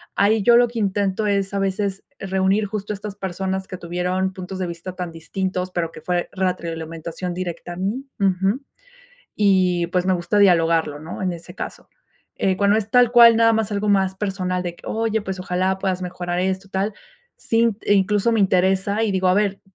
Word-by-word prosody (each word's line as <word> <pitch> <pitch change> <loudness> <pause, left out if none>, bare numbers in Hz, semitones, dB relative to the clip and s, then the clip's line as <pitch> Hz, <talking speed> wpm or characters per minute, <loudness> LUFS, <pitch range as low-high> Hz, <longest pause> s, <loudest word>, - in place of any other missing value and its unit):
ahí 205 +1 +3
yo 235 +2 +6
lo 245 0 +5
que 235 - -8
intento 200 +1 0
es 200 -1 0
a 200 - 0
veces 195 0 -1 0.2
reunir 195 +2 +1
justo 205 0 -4
estas 205 0 -7
personas 190 +1 -3
que 185 - -7
tuvieron 180 +2 -2
puntos 185 0 -7
de 180 - -2
vista 170 +2 -7
tan 180 -2 -5
distintos, 185 +2 -3
pero 165 -2 -2
que 155 - -11
fue 175 +1 -1
retroalimentación 170 -1 -3
directa 175 -1 -5
a - - -8
mí 215 +9 -2
Ujú, 195 +6 +1 0.7
y 185 -4 +3
pues, 180 0 0
me 190 - +3
gusta 175 +3 -1
dialogarlo, 165 -5 +3
¿no?, 160 +4 -7
en 180 -1 0
ese 170 - -11
caso, - - -7 0.5
eh, 190 -1 0
cuando 205 +1 +3
es 210 -1 -3
tal 245 -1 +5
cual 235 -2 +8
nada 230 0 +5
más 220 -1 0
algo 205 +1 -1
más 190 -1 +2
personal 185 -2 -2
de 175 -1 -4
que: - - -20
"Oye, 220 -1 0
pues, 190 -2 -5
ojalá 185 +1 -1
puedas 185 -1 -1
mejorar 175 -1 -3
esto, 190 +1 -2
tal", 195 +2 -1 0.4
sí, 230 0 +2
eh, 205 - +2
incluso 205 +3 +2
me 225 - +2
interesa 190 +3 +2
y 215 - +1
digo: 190 -1 +1
"A 180 - +4
ver, 200 -1 0
190 Hz, 195 wpm, -22 LUFS, 180-205 Hz, 0.7 s, cual